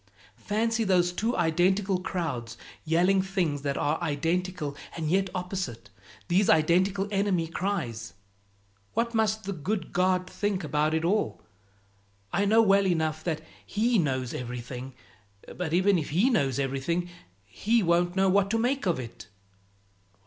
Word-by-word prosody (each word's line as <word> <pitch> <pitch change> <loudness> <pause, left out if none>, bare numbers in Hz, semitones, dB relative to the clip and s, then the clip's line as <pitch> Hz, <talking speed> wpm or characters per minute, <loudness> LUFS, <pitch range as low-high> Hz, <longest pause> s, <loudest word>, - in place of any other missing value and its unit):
"Fancy 225 +2 +1
those 180 -3 +3
two 225 +6 -1
identical 185 +4 +2
crowds 160 - -4 0.3
yelling 180 +4 +3
things 180 -7 -1
that 140 -1 -2
are 150 +3 0
identical 165 0 -1 0.2
and 160 -1 -2
yet 190 +1 +2
opposite, 180 - -4 0.4
these 190 +3 +3
identical 185 +5 +3
enemy 195 -4 +1
cries! 160 - -3 0.8
What 235 0 0
must 220 -1 +1
the 195 0 -3
good 185 +5 -3
God 185 0 +2
think 200 -1 -2
about 150 +1 +1
it 160 +1 0
all? 205 +5 0 0.9
I 200 - +2
know 220 +3 +5
well 200 -1 +4
enough 160 -3 0
that 160 -3 -1 0.2
He 230 +2 +1
knows 130 -5 -1
everything, 125 +1 -6 0.6
but 180 -3 -3
even 185 +2 +3
if 150 - -5
He 195 - +3
knows 135 - +1
everything, 140 +6 -1 0.4
He 220 - +1
won't 175 +1 +2
know 195 0 +3
what 195 +1 +3
to 225 - +1
make 250 +1 0
of 170 -6 +1
it." 115 -3 -9
180 Hz, 140 wpm, -27 LUFS, 155-200 Hz, 0.9 s, know